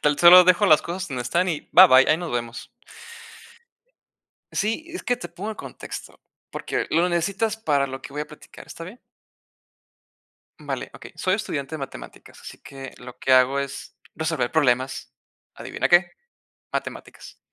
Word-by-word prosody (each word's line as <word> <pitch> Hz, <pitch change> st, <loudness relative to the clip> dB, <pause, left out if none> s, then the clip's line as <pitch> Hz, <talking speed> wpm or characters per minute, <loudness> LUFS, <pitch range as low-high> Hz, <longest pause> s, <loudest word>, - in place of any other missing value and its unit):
Tan 150 Hz, -1 st, +1 dB
solo 180 Hz, +1 st, +9 dB
dejo 185 Hz, +3 st, +4 dB
las 155 Hz, -5 st, +5 dB
cosas 175 Hz, +2 st, -5 dB
donde 130 Hz, -4 st, -4 dB
están 170 Hz, +10 st, 0 dB
y 160 Hz, -4 st, -4 dB
bye 185 Hz, -, +10 dB
bye, 130 Hz, -4 st, +6 dB
ahí 155 Hz, -, +4 dB
nos 170 Hz, -3 st, -6 dB
vemos. 120 Hz, -1 st, -4 dB, 1.8 s
Sí, 225 Hz, +9 st, -1 dB
es 360 Hz, -, -5 dB
que 245 Hz, -, 0 dB
te 230 Hz, -8 st, -8 dB
pongo 185 Hz, +6 st, -6 dB
en 215 Hz, -, -7 dB
contexto, -, -, -9 dB, 0.3 s
porque -, -, -3 dB
lo 170 Hz, +3 st, +2 dB
necesitas 195 Hz, +5 st, -1 dB
para 145 Hz, -10 st, 0 dB
lo 135 Hz, 0 st, -7 dB
que -, -, -11 dB
voy 150 Hz, +1 st, -3 dB
a -, -, -8 dB
platicar, 150 Hz, -1 st, -14 dB
¿está 165 Hz, -, -9 dB
bien? 205 Hz, +9 st, -12 dB, 1.6 s
Vale, -, -, -5 dB
okey. -, -, -12 dB
Soy 185 Hz, -, +1 dB
estudiante 155 Hz, -8 st, -4 dB
de -, -, -4 dB
matemáticas, 135 Hz, -2 st, -10 dB
así -, -, -11 dB
que 135 Hz, -1 st, -10 dB
lo 125 Hz, 0 st, -12 dB
que 130 Hz, -, +1 dB
hago 130 Hz, +2 st, +4 dB
es, 140 Hz, 0 st, -6 dB, 0.2 s
resolver 160 Hz, -6 st, -2 dB
problemas. 130 Hz, -4 st, 0 dB, 0.4 s
¿Adivina -, -, -3 dB
qué? 175 Hz, 0 st, +5 dB, 0.6 s
Matemáticas, -, -, -7 dB
160 Hz, 165 wpm, -23 LUFS, 135-185 Hz, 1.8 s, bye